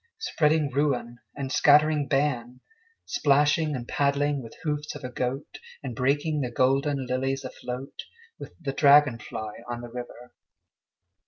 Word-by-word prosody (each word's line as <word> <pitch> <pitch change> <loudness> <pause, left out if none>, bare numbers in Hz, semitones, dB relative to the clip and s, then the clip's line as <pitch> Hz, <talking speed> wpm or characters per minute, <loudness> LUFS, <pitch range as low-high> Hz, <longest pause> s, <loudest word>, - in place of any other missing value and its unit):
Spreading 155 - +1
ruin 125 -4 -1 0.2
and 135 -2 -4
scattering 150 0 +4
ban, 125 -4 -1 0.4
Splashing 150 +2 +2
and 120 -2 -6
paddling 140 0 +1
with 115 - -11
hoofs 150 -2 -3
of - - -9
a 125 - -5
goat, 130 +3 -4 0.2
And 125 -4 -5
breaking 145 +5 +1
the 125 - -2
golden 135 +2 +1
lilies 135 +2 -1
afloat 130 +1 -7 0.3
With - - -9
the 140 -5 -3
dragon 140 -4 +5
fly 110 -2 -7
on 120 0 -4
the 120 -1 -9
river. 125 0 -9
135 Hz, 140 wpm, -26 LUFS, 125-145 Hz, 0.4 s, dragon